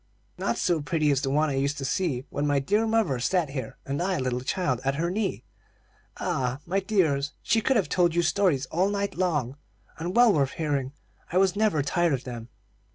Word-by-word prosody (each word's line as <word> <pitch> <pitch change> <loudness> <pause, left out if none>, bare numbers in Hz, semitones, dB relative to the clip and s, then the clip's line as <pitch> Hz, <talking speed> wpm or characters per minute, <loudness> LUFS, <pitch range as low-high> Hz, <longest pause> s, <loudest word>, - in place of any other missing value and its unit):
"Not - - -1
so 170 -3 +1
pretty 155 -1 +1
as 140 -1 +1
the 135 - -1
one 150 +2 +2
I 135 - -1
used 140 +1 0
to 135 - -4
see 135 -4 -1
when 145 +1 -1
my 145 -1 +2
dear 205 +11 +1
mother 220 - +1
sat 165 +3 0
here, 135 -2 -5
and 140 +4 -2
I, 185 +1 0
a - - -2
little 125 -1 -1
child, 130 -3 -1
at 135 +1 0
her 170 +4 -1
knee. 200 0 -2 0.7
Ah, 125 0 -1
my 190 +3 0
dears, 155 -8 +1
she 225 - +2
could 265 +5 +2
have 205 -6 +2
told 175 -2 +2
you 175 - +3
stories 170 -5 +2
all 185 +4 +2
night 200 0 -2
long, 150 -8 -1 0.4
and 175 +3 -3
well 240 -3 +6
worth 140 -3 +1
hearing. 145 -4 -1 0.4
I 180 - +1
was 190 0 +3
never 205 -9 +2
tired 170 +2 +1
of 130 -1 -2
them." 120 -2 -7
155 Hz, 215 wpm, -26 LUFS, 135-185 Hz, 0.7 s, well